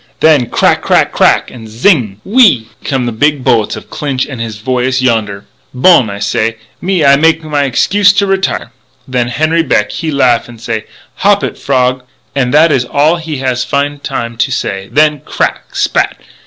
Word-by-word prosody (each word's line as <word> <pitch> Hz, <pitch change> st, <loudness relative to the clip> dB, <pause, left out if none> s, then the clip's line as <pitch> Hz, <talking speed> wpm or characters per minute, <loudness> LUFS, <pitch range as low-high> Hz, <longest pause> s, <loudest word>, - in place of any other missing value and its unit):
"Then 150 Hz, -6 st, +3 dB
crack! -, -, +2 dB
crack! -, -, +2 dB
crack! -, -, +2 dB
and 115 Hz, -3 st, -11 dB
zing 115 Hz, -, +1 dB
gg! -, -, -30 dB
whee 250 Hz, +6 st, +4 dB
ee! 125 Hz, -, +3 dB, 0.2 s
come 135 Hz, -3 st, -1 dB
the 120 Hz, -, -2 dB
big 145 Hz, +4 st, 0 dB
bullets 110 Hz, -4 st, +1 dB
of -, -, -12 dB
Clinch 135 Hz, -3 st, -2 dB
and 135 Hz, -5 st, -7 dB
his 110 Hz, -2 st, -5 dB
voyous 130 Hz, +3 st, -1 dB
yonder. 110 Hz, -6 st, -1 dB, 0.3 s
"'Bon,' 130 Hz, -, +4 dB
I 100 Hz, -, -6 dB
say, 110 Hz, +2 st, -1 dB, 0.2 s
'me, 180 Hz, -4 st, 0 dB
I 140 Hz, 0 st, +6 dB
make 160 Hz, +2 st, +2 dB
my 145 Hz, -2 st, -1 dB
excuse 200 Hz, +10 st, +3 dB
to 200 Hz, 0 st, +1 dB
retire.' 195 Hz, -1 st, -1 dB, 0.4 s
"Then 125 Hz, -2 st, -1 dB
Henri 155 Hz, +6 st, 0 dB
Beck 105 Hz, -9 st, 0 dB
he 165 Hz, -, -4 dB
laugh 125 Hz, -5 st, +1 dB
and 120 Hz, -2 st, -13 dB
say, 115 Hz, -1 st, -4 dB, 0.3 s
'Hop -, -, +2 dB
it, -, -, -3 dB
frog!' 130 Hz, -1 st, 0 dB, 0.3 s
And 125 Hz, -3 st, 0 dB
that 155 Hz, +3 st, +4 dB
is 130 Hz, -4 st, +2 dB
all 150 Hz, +7 st, +1 dB
he 160 Hz, -3 st, -5 dB
has 130 Hz, -1 st, 0 dB
find 145 Hz, 0 st, -2 dB
time 115 Hz, -1 st, -4 dB
to 115 Hz, -, 0 dB
say, 95 Hz, 0 st, -3 dB
when 150 Hz, 0 st, +2 dB
crack! -, -, -3 dB
spat! -, -, 0 dB
130 Hz, 190 wpm, -12 LUFS, 115-155 Hz, 0.4 s, I